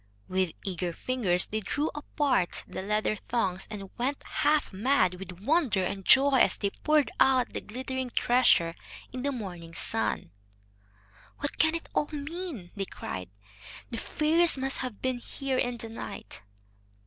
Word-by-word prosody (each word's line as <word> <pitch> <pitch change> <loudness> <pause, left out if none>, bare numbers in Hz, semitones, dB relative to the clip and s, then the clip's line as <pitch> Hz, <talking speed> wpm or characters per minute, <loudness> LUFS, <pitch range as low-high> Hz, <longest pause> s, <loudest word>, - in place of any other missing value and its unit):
With 185 -2 0
eager 180 -2 -2
fingers 195 -6 +1
they 215 - -2
drew 290 +9 -1
apart 290 -9 0
the - - -5
leather 210 +2 0
thongs, 190 -7 -1
and 200 -3 -7
went 270 +4 -1
half 295 -4 +1
mad 210 -2 +3
with 185 -1 -9
wonder 265 - +2
and 195 +1 -3
joy 270 +5 +6
as - - +4
they 200 -1 -1
poured 300 -2 +2
out 260 -2 +4
the - - -3
glittering 260 +2 -4
treasure 240 -10 +4 0.4
in 255 - -4
the 280 +2 0
morning 175 -9 -7
sun. - - -1 1.1
"What 285 - -3
can 320 0 +4
it 330 - -5
all 295 - +1
mean?" 295 - -5
they 200 -1 -2
cried. 90 - -6 0.6
"The 230 - -3
fairies 320 +1 +3
must 270 +1 +1
have 250 -5 -5
been 255 -1 0
here 265 +1 -2
in 245 -1 0
the 225 0 -6
night." 225 - -7
245 Hz, 155 wpm, -29 LUFS, 190-280 Hz, 1.1 s, joy